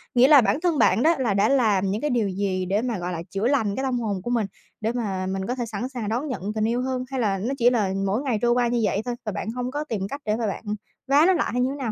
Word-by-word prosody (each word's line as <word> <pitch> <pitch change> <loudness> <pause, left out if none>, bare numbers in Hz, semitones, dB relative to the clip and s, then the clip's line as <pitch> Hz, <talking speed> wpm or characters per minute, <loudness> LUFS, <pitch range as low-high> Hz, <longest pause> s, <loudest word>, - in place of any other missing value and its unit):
Nghĩa 250 +2 +7
là 290 -2 +8
bản 245 - +1
thân 340 -3 +1
bạn 240 - +3
đó 330 +2 +4
là 240 -6 +1
đã 200 +1 +3
làm 210 -8 +2
những 210 +3 -2
cái 300 - 0
điều 235 -6 +1
gì 185 -1 -1
để 195 +4 0
mà, 240 -3 -2
gọi 175 +1 -3
là, 165 - -4
chữa 195 +4 -1
lành 225 -7 +1
cái 265 - -2
tâm 255 -2 0
hồn 205 -5 -2
của 240 - -5
mình? 230 -3 +1 0.4
Để 220 +1 0
mà 200 -6 -2
mình 190 0 -2
có 250 - -1
thể 245 -2 -3
sẵn 230 +3 -4
sàng 240 -6 -4
đón 245 +7 -1
nhận 255 - -4
tình 215 0 +1
yêu 240 +2 0
hơn, 255 0 -2
hay 265 - -2
là 205 -5 +1
nó 225 +8 -2
chỉ 240 -1 +5
là 210 -6 0
mỗi 200 +5 0
ngày 260 -6 0
trôi 240 0 +3
qua 240 0 +2
như 240 0 0
vậy 205 0 +1
thôi 245 -1 -2
và 215 - -2
bạn 215 - -4
hông 250 +1 -4
có 295 +2 -2
tìm 225 -10 -4
cách 280 +1 -6
để 210 - +1
mà 225 -1 -1
bạn 200 - -4 0.4
vá 280 +3 +5
nó 380 - +5
lại 350 - 0
hay 250 - 0
như 255 - +2
thế 275 - -4
nào 260 -6 -3
235 Hz, 320 wpm, -24 LUFS, 205-255 Hz, 0.4 s, là